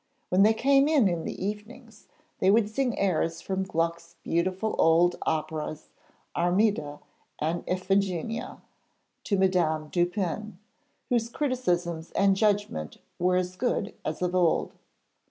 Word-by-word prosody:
When 185 +2 +3
they 215 +2 +5
came 275 +4 +4
in 205 - +2
the 185 - -4
evenings, 215 +2 -7 0.3
they 190 - +3
would 210 0 +3
sing 250 0 -1
airs 165 -3 0
from 190 0 -3
Gluck's 170 -2 -2
beautiful 185 +5 -1
old 170 +2 +4
operas 155 -1 -3 0.5
'Armida' 175 -4 +1 0.4
and 160 +3 -2
'Iphigenia' 195 +4 -1 0.6
to 200 - +1
Madame 170 -5 +1
Dupin, 180 +3 -1 0.5
whose 235 -2 +1
criticisms 180 - -1
and 195 -1 +3
judgment 205 - 0 0.2
were 180 +1 +2
as 180 0 -1
good 220 -1 -1
as - - -3
of 180 0 0
old. 175 -3 +2
185 Hz, 120 wpm, -27 LUFS, 170-215 Hz, 0.6 s, they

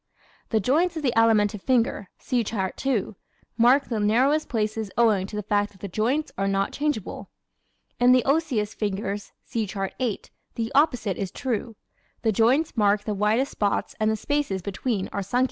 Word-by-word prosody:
The 220 - +2
joints 325 - +1
of 310 - -4
the 250 -4 +1
Alimentive 215 -2 +3
finger 235 -6 +1
(See 245 -2 -1
Chart 195 -4 -3
2) 235 -7 -1 0.4
mark 250 +4 +4
the 225 -3 -2
narrowest 255 +9 +2
places 220 -2 -1
owing 215 -5 +3
to 210 - -8
the 210 - -3
fact 205 0 0
that 190 - -21
the 200 - -4
joints 240 - -1
are 195 - +1
not 195 0 0
changeable. 295 -9 -3 0.7
In 245 +1 +6
the 255 -1 +4
Osseous 270 -8 +1
fingers 205 -1 -3
(See 225 -2 -2
Chart 195 0 -4
8) 240 -6 -3 0.2
the 225 -1 -3
opposite 245 - +2
is 195 -2 -3
true. 230 +1 -3 0.5
The 225 - +3
joints 250 +10 +2
mark 205 -2 +2
the 210 - -2
widest 215 +7 +1
spots 205 -1 -1
and 215 0 +2
the 220 - +1
spaces 220 -6 -1
between 200 +1 -2
are 200 - -1
sunken. 200 +6 -1
220 Hz, 180 wpm, -25 LUFS, 205-255 Hz, 0.7 s, In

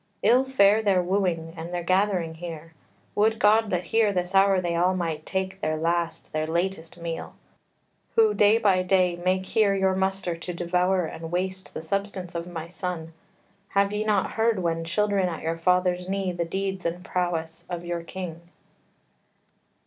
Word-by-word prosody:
Ill 245 +5 +5
fare 220 -5 +4
their 200 -4 +3
wooing, 175 -3 -1
and 165 +1 -6
their 175 -1 -3
gathering 185 -2 +1
here! 165 -1 -8 0.4
Would 220 +2 +2
God 215 +1 +4
that 180 -2 0
here 220 +4 +2
this 180 -1 -2
hour 195 0 +5
they 175 -2 -1
all 180 +2 +2
might 165 -4 -3
take 190 0 -3
Their 155 0 0
last, 165 0 -1
their 155 0 -1
latest 170 0 -2
meal! 170 -1 -5 0.8
Who 440 -2 +5
day 210 +2 +5
by 200 -5 +3
day 185 -1 +2
Make 185 +2 0
here 205 -1 +2
your 190 -1 +2
muster, 190 -2 0
to 170 +2 -6
devour 180 +1 +1
and 160 +1 -7
waste 185 +1 -3
The - - -5
substance 195 0 -3
of 170 0 -4
my 165 -2 -6
son: 170 -2 -5 0.5
have 200 0 +1
ye 210 +1 0
not 210 -3 +1
heard 225 -1 +1
When 165 -2 -1
children 195 +2 +1
at 165 - -6
your 165 +1 -2
fathers' 180 +1 +1
knee 195 -1 -1
the 175 -1 -2
deeds 190 +2 -3
And 175 +2 -3
prowess 165 -3 -2
of 175 -1 -5
your 175 0 -3
king?" 170 -1 -7
180 Hz, 170 wpm, -26 LUFS, 170-195 Hz, 0.8 s, Ill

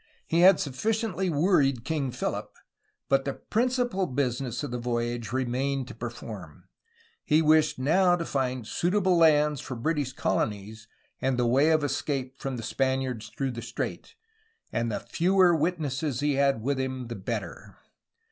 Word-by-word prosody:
He 165 - +1
had 185 +1 +7
sufficiently 190 - -1
worried 145 - +2
King 145 -2 -1
Philip, 125 0 -3 0.6
but 135 0 +3
the 140 - -3
principal 245 -5 0
business 125 -1 -2
of 145 - -4
the 125 - -3
voyage 120 -1 -2
remained 130 +1 -1
to - - -7
perform. 110 -8 -8 0.6
He 155 0 +3
wished 155 0 +4
now 175 +7 +3
to 170 -1 -3
find 130 -5 -2
suitable 185 - +1
lands 150 -4 +4
for 130 - -6
British 145 +2 -1
colonies 110 -1 -2 0.3
and 130 -1 +1
the 125 - +2
way 135 +6 +4
of 155 -2 +3
escape 135 -1 -2
from 135 -2 -4
the 115 - -6
Spaniards 130 -2 -1
through 135 -1 -1
the 120 -1 -6
strait, 115 0 -5 0.6
and 115 0 0
the - - -2
fewer 180 0 +3
witnesses 150 -5 -1
he 145 0 +1
had 140 -4 +2
with 140 +1 0
him, 130 -1 -3
the 120 0 -6
better. 95 - -5
135 Hz, 155 wpm, -27 LUFS, 120-160 Hz, 0.6 s, had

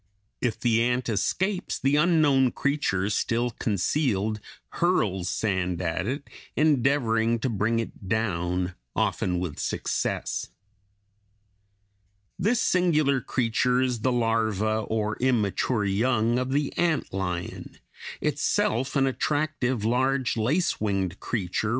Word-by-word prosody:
If 115 -3 -1
the 115 -1 +2
ant 125 +1 0
escapes, 185 - -1
the 135 +2 +1
unknown 150 -5 +4
creature, 140 -10 0
still 120 +3 0
concealed, 110 - 0 0.3
hurls 100 - 0
sand 95 -4 -1
at 90 +2 -2
it, 140 +3 -3 0.3
endeavoring 125 -6 +2
to 130 +3 -2
bring 115 +1 0
it 115 -3 -5
down, 90 -4 -1 0.2
often 90 -1 0
with 85 -5 -4
success. - - -2 1.9
This 220 +6 +2
singular 155 -7 +2
creature 125 +1 +1
is 125 -2 0
the 130 +4 +1
larva 110 -3 +1
or 110 0 -2
immature 115 -2 +1
young 115 +3 +1
of 130 0 -2
the 145 0 0
ant 165 - 0
lion 90 -2 -4 0.4
itself 125 +6 0
an 135 -1 +3
attractive, 135 -4 -1
large, 130 +2 +1
lace 130 - 0
winged 95 -3 -1
creature 105 -2 -2
(Fig. - - 0
115 Hz, 115 wpm, -26 LUFS, 105-135 Hz, 1.9 s, unknown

